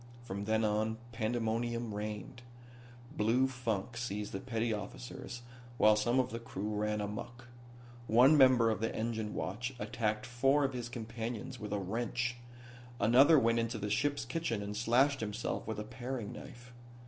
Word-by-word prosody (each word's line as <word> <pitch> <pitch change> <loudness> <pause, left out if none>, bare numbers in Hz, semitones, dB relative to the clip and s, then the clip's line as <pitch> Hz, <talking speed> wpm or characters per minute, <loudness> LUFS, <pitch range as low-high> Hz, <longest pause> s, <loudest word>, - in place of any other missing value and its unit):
From 100 -3 -5
then 110 +1 +2
on 110 +1 0
pandemonium 115 0 -1
reigned. 105 +3 -5 0.7
Blue 120 +5 +3
funk 120 -3 -3
seized 105 -4 -3
the 95 - -3
petty 115 -2 -1
officers 105 - -7 0.3
while 110 -1 +6
some 120 +4 +2
of 125 0 +1
the 115 - -4
crew 110 -3 -4
ran 105 0 0
amuck. 120 +4 -6 0.6
One 125 +7 +7
member 130 -5 +6
of 110 - -2
the 115 - -1
engine 110 -1 -2
watch 120 +7 -3
attacked 110 -1 -1
four 135 +4 +3
of 135 -1 0
his 120 -1 -4
companions 115 -1 -5
with 105 -1 -6
a 105 - 0
wrench; 120 +5 -2 0.6
another 135 +7 +7
went 115 -3 +3
into 115 0 -1
the 105 -1 -3
ship's 145 +3 +1
kitchen 125 -6 -2
and 100 +1 -5
slashed 125 +5 +3
himself 110 +1 -3
with 110 -1 -3
a - - -3
paring 125 -1 -5
knife. 120 0 -11
115 Hz, 160 wpm, -33 LUFS, 105-125 Hz, 0.7 s, One